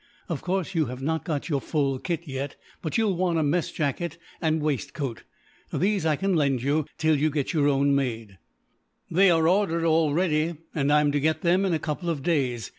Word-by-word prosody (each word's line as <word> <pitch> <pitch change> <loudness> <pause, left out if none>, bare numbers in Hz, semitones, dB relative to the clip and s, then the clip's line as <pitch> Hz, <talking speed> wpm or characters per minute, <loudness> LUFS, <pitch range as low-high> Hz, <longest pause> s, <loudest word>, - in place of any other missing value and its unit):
Of 165 -5 -3
course, 190 0 -2
you 160 -3 +2
have 125 +2 -7
not 160 +2 -1
got 155 -6 -2
your 145 -5 0
full 140 -3 0
kit 170 0 -3
yet; 135 0 -4 0.3
but 160 - -2
you 225 - +2
will 195 -4 0
want 175 -2 +1
a 160 - +2
mess 155 +3 0
jacket 155 +4 -2 0.2
and 160 -1 +1
waistcoat. 145 -3 -3 0.5
These 195 -2 +1
I 155 - +3
can 195 +6 0
lend 140 -6 +1
you, 145 +2 +1
till 155 0 +3
you 150 +2 +2
get 145 0 -2
your 145 -3 +3
own 140 0 +3
made." 115 -8 -2 0.7
"They 190 +3 +5
are 165 -2 +3
ordered 175 -3 +2
already, 160 0 +2 0.2
and 145 -2 +1
I 150 0 +5
am 145 -1 +2
to 145 - +1
get 155 +2 +1
them 185 +2 +3
in 185 - +1
a - - +2
couple 155 +3 -3
of 150 -5 -2
days. 130 - 0
155 Hz, 210 wpm, -26 LUFS, 140-170 Hz, 0.7 s, They